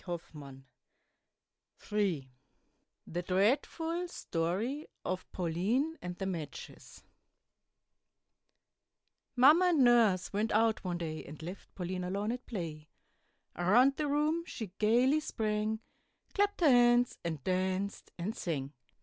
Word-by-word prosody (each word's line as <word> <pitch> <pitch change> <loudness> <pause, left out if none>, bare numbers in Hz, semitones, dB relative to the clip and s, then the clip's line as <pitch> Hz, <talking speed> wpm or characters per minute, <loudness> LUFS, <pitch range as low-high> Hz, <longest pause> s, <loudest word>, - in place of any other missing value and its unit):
THE 150 -6 -8 2.6
DREADFUL 295 - +1
STORY 215 - -2 0.2
OF 185 0 -4
PAULINE 205 - 0
AND 180 0 -6
THE 195 - -3
MATCHES 165 -6 -7 2.3
Mamma 295 +8 +7
and 330 -7 +4
Nurse 230 -8 +4
went 215 +2 0
out 220 +1 +2
one 180 -2 -2
day, 160 -2 -4
And 150 +1 -10
left 180 +4 -9
Pauline 180 0 -3
alone 200 +4 -2
at 250 +1 -6
play; 160 -7 -6 0.7
Around 240 +11 +4
the 300 - -1
room 300 +3 +1
she 215 -6 -6
gayly 245 +7 +4
sprang, 215 -5 -2 0.5
Clapp'd 405 -2 +1
her 320 - +6
hands, 245 0 +4
and 160 -5 -4
danced, 190 +2 -1
and 185 +6 -3
sang. 140 -5 -3
210 Hz, 105 wpm, -32 LUFS, 175-255 Hz, 2.6 s, Mamma